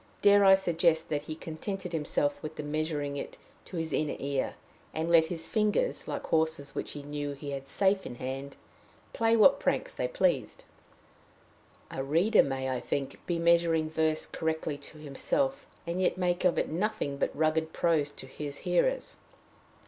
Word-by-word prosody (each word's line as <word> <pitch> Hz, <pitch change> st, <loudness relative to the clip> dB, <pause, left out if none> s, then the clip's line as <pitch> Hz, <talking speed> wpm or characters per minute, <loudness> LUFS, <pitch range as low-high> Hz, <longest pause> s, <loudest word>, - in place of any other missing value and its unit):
Dare 205 Hz, 0 st, +7 dB
I 195 Hz, -1 st, +8 dB
suggest 170 Hz, -3 st, +1 dB
that 150 Hz, -2 st, 0 dB
he 155 Hz, -, -5 dB
contented 175 Hz, +3 st, -5 dB
himself 145 Hz, -2 st, 0 dB
with 155 Hz, 0 st, -7 dB
measuring 150 Hz, -1 st, -2 dB
it -, -, -6 dB, 0.3 s
to 180 Hz, -, -7 dB
his 160 Hz, -1 st, -2 dB
inner 155 Hz, -1 st, 0 dB
ear, 140 Hz, -1 st, -2 dB, 0.4 s
and 160 Hz, +2 st, -1 dB
let 165 Hz, -1 st, +7 dB
his 165 Hz, -1 st, -4 dB
fingers, 215 Hz, -, 0 dB
like -, -, -3 dB
horses 160 Hz, -3 st, 0 dB
which -, -, -3 dB
he 145 Hz, -, -7 dB
knew 145 Hz, 0 st, -4 dB
he 140 Hz, +1 st, -7 dB
had 135 Hz, -1 st, -5 dB
safe 190 Hz, +5 st, +2 dB
in -, -, -7 dB
hand, 135 Hz, +3 st, -5 dB, 0.6 s
play 230 Hz, 0 st, +3 dB
what 270 Hz, +6 st, +6 dB
pranks -, -, 0 dB
they -, -, -1 dB
pleased? -, -, 0 dB, 1.3 s
A 135 Hz, -, -3 dB
reader 170 Hz, +11 st, +4 dB
may, 135 Hz, -1 st, -2 dB
I 130 Hz, -1 st, -1 dB
think, 140 Hz, +1 st, -4 dB
be 175 Hz, -, 0 dB
measuring 170 Hz, -2 st, +3 dB
verse 160 Hz, -1 st, +1 dB
correctly 160 Hz, -2 st, -2 dB
to 145 Hz, +2 st, -11 dB
himself, 265 Hz, -, -1 dB, 0.2 s
and 170 Hz, +2 st, -2 dB
yet 185 Hz, -, +2 dB
make 180 Hz, -1 st, 0 dB
of 180 Hz, -, +3 dB
it -, -, +1 dB
nothing 175 Hz, -5 st, -1 dB
but -, -, +1 dB
rugged 160 Hz, +1 st, +1 dB
prose 160 Hz, -4 st, +1 dB
to 145 Hz, -, -10 dB
his 140 Hz, +1 st, -6 dB
hearers. 340 Hz, -, +1 dB
160 Hz, 170 wpm, -30 LUFS, 145-180 Hz, 1.3 s, I